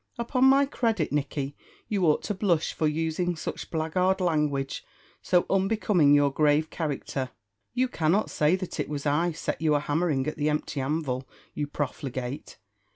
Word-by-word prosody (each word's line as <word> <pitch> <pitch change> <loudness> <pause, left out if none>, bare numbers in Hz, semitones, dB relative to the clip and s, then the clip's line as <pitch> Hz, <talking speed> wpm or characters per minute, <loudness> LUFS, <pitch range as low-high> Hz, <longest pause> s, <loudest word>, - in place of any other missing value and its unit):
Upon 250 +2 +1
my 275 +1 +6
credit, 225 - 0
Nicky, 140 -1 -2 0.3
you 195 -5 +1
ought 150 - +3
to 210 - -2
blush 185 -5 +1
for 155 - 0
using 165 +3 -1
such 155 - -5
blackguard 180 +4 +1
language, 150 -6 0 0.4
so 180 -1 +2
unbecoming 195 -6 +3
your 145 -1 +4
grave 150 +1 +2
character. 140 -4 -3 0.5
You 255 +1 +2
cannot 185 -2 +1
say 150 +4 +3
that 185 -1 -6
it - - -2
was 145 -1 -4
I 155 +4 +2
set 160 - -4
you 155 -2 +3
a - - +3
hammering 145 -2 0
at 155 - -3
the 150 0 +1
empty 150 -1 -2
anvil, 135 -2 -2 0.2
you 145 - -2
profligate. 135 -2 -4
155 Hz, 160 wpm, -27 LUFS, 145-185 Hz, 0.5 s, my